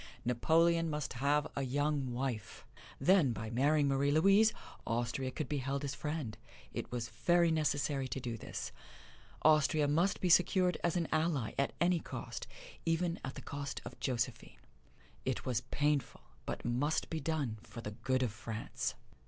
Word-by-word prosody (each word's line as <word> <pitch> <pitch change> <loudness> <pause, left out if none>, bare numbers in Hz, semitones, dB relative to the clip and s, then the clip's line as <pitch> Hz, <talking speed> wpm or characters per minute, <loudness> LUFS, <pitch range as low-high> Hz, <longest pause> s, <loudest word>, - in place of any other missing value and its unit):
Napoleon 165 +7 +3
must 150 -2 -3
have 140 +3 +2
a 140 - -1
young 140 0 0
wife. 120 -3 -4 0.3
Then 180 -9 +4
by 110 0 -5
marrying 145 +4 +3
Marie 140 +1 +2
Louise, 195 +8 +5 0.3
Austria 120 +3 -1
could 130 +2 -4
be 145 +1 -1
held 135 +2 -2
as 140 -1 -2
friend: 145 -7 -4 0.3
it - - -5
was 120 -2 -3
very 165 +10 +3
necessary 145 -3 +1
to 135 - -3
do 120 -2 -4
this. 110 - -6 0.7
Austria 155 -1 +4
must 170 +7 +2
be 185 - +1
secured 180 +1 +4
as 175 0 +2
an 170 -2 0
ally 155 -7 +1
at 140 - +1
any 175 0 +3
cost - - -6 0.4
even 165 +1 0
at 135 - -5
the - - -8
cost 140 -1 -4
of 120 - -9
Josephine. 125 -4 -2 0.7
It 130 -2 -2
was 120 -3 0
painful, 145 -1 0 0.3
but - - -4
must 130 +6 0
be 160 - -1
done 145 -9 -2
for 115 - -9
the 105 - -5
good 130 +4 0
of 120 - 0
France. 110 +1 -4
140 Hz, 160 wpm, -34 LUFS, 125-160 Hz, 0.7 s, Louise